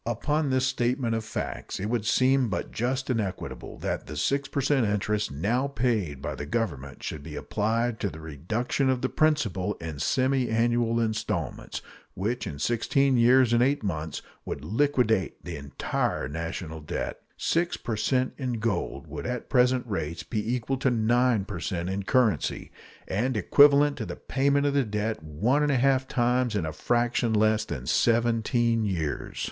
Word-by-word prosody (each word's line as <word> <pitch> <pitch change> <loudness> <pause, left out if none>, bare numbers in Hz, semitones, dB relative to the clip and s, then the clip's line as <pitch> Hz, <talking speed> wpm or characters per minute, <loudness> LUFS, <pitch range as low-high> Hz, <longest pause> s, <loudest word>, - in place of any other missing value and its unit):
Upon 150 +6 0
this 130 0 +2
statement 125 -1 0
of 115 -1 -1
facts - - -5
it 95 - -3
would 110 -1 -1
seem 130 0 +3
but 100 - -3
just 130 +3 -1
and 115 -3 +1
equitable 95 -3 -6
that - - -3
the - - -6
6 140 0 0
per - - -2
cent 135 -3 +2
interest 105 -1 0
now 110 - 0
paid 110 - -1
by - - -2
the 70 - -6
Government 75 - -3
should 75 - -4
be - - -8
applied 115 +2 -1
to 100 - -1
the 80 - -10
reduction 100 - -1
of 130 -1 0
the 130 - +1
principal 110 - +1
in 80 -4 -7
semiannual 120 - +1
installments, 110 -1 -2 0.3
which 110 +6 -2
in 70 - -6
sixteen 130 - +2
years 120 0 +5
and 120 - +4
eight 135 0 +2
months 80 -5 -3 0.2
would - - -5
liquidate 110 - +1
the 85 -1 -5
entire 70 -1 -2
national 80 +1 -5
debt. 75 - -4 0.2
Six 170 +1 0
per 115 - -3
cent 130 +4 +1
in 130 -3 -2
gold 115 -1 -2
would - - -6
at 125 -1 -4
present 125 -1 +3
rates 85 -6 -3
be 110 +2 -1
equal 125 +2 -2
to 130 0 +2
9 120 -2 +2
per 100 -5 -6
cent 90 0 -2
in 100 +1 -2
currency, 110 - +1 0.4
and 115 +5 0
equivalent 145 +7 +5
to - - -4
the - - -5
payment 140 +1 +1
of 145 - +2
the 140 -1 +3
debt 105 -2 -2
one 100 - +1
and 150 -1 +2
a 135 - +3
half 130 +1 +2
times 125 -1 +1
in 95 -6 0
a 80 - -4
fraction 120 +4 +1
less 110 0 +3
than 65 - -5
seventeen 115 - +2
years. 85 -8 -3
115 Hz, 175 wpm, -27 LUFS, 100-130 Hz, 0.4 s, years